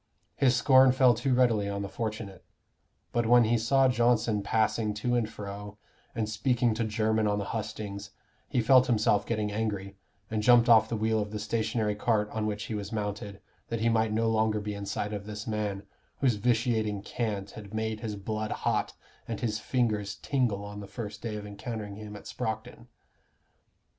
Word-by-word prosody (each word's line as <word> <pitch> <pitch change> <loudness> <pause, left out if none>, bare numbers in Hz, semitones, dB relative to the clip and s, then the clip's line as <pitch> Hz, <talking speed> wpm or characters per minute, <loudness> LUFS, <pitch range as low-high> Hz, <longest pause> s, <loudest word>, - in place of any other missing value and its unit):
His 130 -2 +3
scorn 130 0 +6
fell 130 -2 +5
too 125 +3 0
readily 115 -5 +3
on 100 0 -3
the - - -3
fortunate. 105 -3 -5 0.7
But 120 -1 0
when 120 +1 +7
he 115 +1 +2
saw 135 +4 +4
Johnson 120 -3 +2
passing 110 +1 0
to 120 +3 -1
and 120 -3 +1
fro, 105 -1 -8 0.4
and 110 -2 -1
speaking 115 +2 +1
to 115 +1 -1
Jermyn 110 0 +1
on 105 0 +1
the 100 - -2
hustings, 105 -2 -5 0.4
he 125 - +1
felt 130 +1 +6
himself 105 -3 +2
getting 105 -2 -1
angry, 100 -2 -3 0.3
and 110 -1 0
jumped 120 +1 +6
off 115 -2 +6
the 115 - -1
wheel 110 +1 +1
of 105 0 -2
the 105 - -5
stationary 110 0 -1
cart 105 0 0
on 110 -1 -2
which 105 0 -3
he - - -5
was 105 0 -4
mounted, 105 -2 -4 0.3
that 115 -2 -3
he 115 - +3
might 110 -1 +2
no 115 +1 +1
longer 110 -1 +2
be 105 0 -4
in 100 0 -6
sight 105 +1 -2
of 100 0 -5
this 105 0 -6
man, 105 -2 -2 0.4
whose 130 -3 +3
vitiating 110 -2 0
cant 105 -5 -3
had 105 -2 -10
made 110 0 -2
his 110 -2 -4
blood 110 +2 -3
hot - - -1 0.3
and 115 -3 -4
his 110 -3 -1
fingers 110 -6 0
tingle 115 -8 -1
on 105 0 -7
the 100 - -8
first 105 -1 -7
day 110 -2 -4
of 105 -1 -6
encountering 105 0 -6
him 105 -1 -8
at 105 - -10
Sproxton. 110 +2 -5
110 Hz, 190 wpm, -29 LUFS, 105-115 Hz, 0.7 s, when